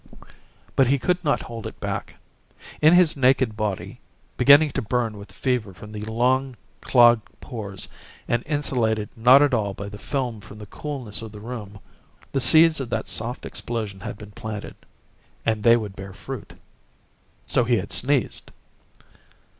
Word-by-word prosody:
But 135 - +4
he 140 +3 +3
could 180 +7 0
not 145 -2 +1
hold 115 -2 -7
it - - -11
back. - - -4 0.7
In 155 +3 +7
his 175 -3 +5
naked 130 -4 +2
body, 105 -3 -4 0.3
beginning 145 +2 +6
to 135 - -2
burn 115 -1 -1
with 100 0 -11
fever 120 -7 -2
from 105 +3 -11
the 105 -1 -6
long 125 +4 +1 0.3
clogged 120 -3 +5
pores 100 -5 -7 0.4
and 120 0 +1
insulated 120 -8 0
not 125 +5 +7
at 145 -2 +2
all 100 -4 0
by 100 0 -6
the 105 0 -10
film 125 -5 -3
from 105 - -12
the 105 - -9
coolness 125 -1 -6
of 110 -1 -8
the 105 - -10
room, 105 -3 -8 0.5
the 135 - 0
seeds 160 +3 +6
of 130 -3 -4
that - - -2
soft 120 +2 -1
explosion 110 -5 -4
had 95 - -7
been 105 -1 -11
planted 105 0 -7 0.7
and 110 -2 0
they 115 +2 +6
would 105 -4 -6
bear 95 0 -9
fruit! - - -8 0.9
So - - +2
he 120 +1 +2
had 100 - -3
sneezed! 135 0 0
115 Hz, 160 wpm, -23 LUFS, 105-135 Hz, 0.9 s, In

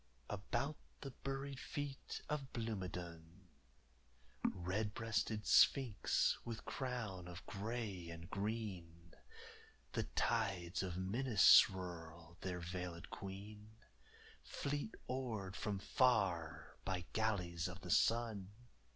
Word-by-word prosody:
About 120 +8 -1 0.2
the 135 - -5
buried 135 +1 -4
feet 145 -2 -4
of 145 -3 -2
Blomidon, 90 -5 -5 0.9
Red 100 +4 0
breasted 110 -1 0
sphinx 125 -7 +5
with 115 -1 -5
crown 110 -9 -3
of 90 +3 -8
grey 105 -4 -3
and 85 0 -7
green, 95 -5 -4 0.8
The - - 0
tides 90 -2 +1
of 90 -2 -3
Minas 105 +2 +2
swirl, 85 -2 +5
their 90 -2 -3
veilëd 90 0 -5
queen 105 +3 -8 0.7
Fleet 145 - -3
oared 110 -7 -2
from 100 -1 -1
far 85 - +2
by 95 -2 -2
galleys 90 -6 +1
of 90 +1 -7
the 90 -3 -4
sun. 110 -4 +3
100 Hz, 100 wpm, -39 LUFS, 90-115 Hz, 0.9 s, sphinx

